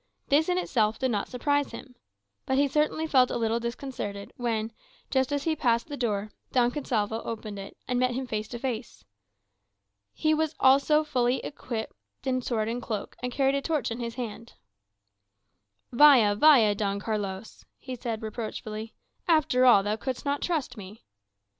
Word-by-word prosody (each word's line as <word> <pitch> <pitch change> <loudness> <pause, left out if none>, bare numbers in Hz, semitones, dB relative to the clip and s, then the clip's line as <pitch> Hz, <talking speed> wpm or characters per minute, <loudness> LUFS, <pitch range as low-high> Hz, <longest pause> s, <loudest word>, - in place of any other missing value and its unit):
This 305 +5 +3
in 360 - +2
itself 220 -11 +1
did 260 -1 0
not 205 -3 -1
surprise 285 +3 0
him. 255 - -10 0.5
But 265 - +1
he 285 +1 +4
certainly 305 +3 0
felt 260 -5 +4
a - - -2
little 230 0 0
disconcerted 235 -4 -5
when, 225 -2 -2 0.4
just 265 +1 +1
as 285 -1 -1
he 320 0 0
passed 235 -1 +1
the 290 - -4
door, 215 -5 -2 0.2
Don 245 -2 +3
Gonsalvo 225 -5 -1
opened 215 -3 -6
it, 195 - -9
and 250 0 0
met 250 -1 +1
him 260 +1 -2
face 215 -3 -3
to 240 - -6
face. 235 -2 -5 1.1
He 310 0 +1 0.3
also 280 +3 +5
was 310 - -9
fully 250 -3 +1
equipped 240 -6 -5 0.3
in 255 -1 0
sword 225 -3 -1
and 235 +2 -3
cloak, 215 -4 -5
and 250 0 -3
carried 270 +1 +2
a 280 - 0
torch 285 -7 -1
in 230 - -4
his 235 -1 -4
hand. 235 -2 -6 1.4
"Vaya, 245 -6 +7
vaya, 225 -3 +6
Don 200 -1 -2
Carlos," 205 -1 -4
he 260 - -8
said 230 -2 -4
reproachfully; 220 0 -6 0.3
"after 300 -6 +3
all, 205 -5 +7
thou 210 +2 -1
couldst 260 +3 -4
not 285 0 0
trust 295 -8 -2
me." 205 +2 -11
245 Hz, 170 wpm, -27 LUFS, 220-275 Hz, 1.4 s, Vaya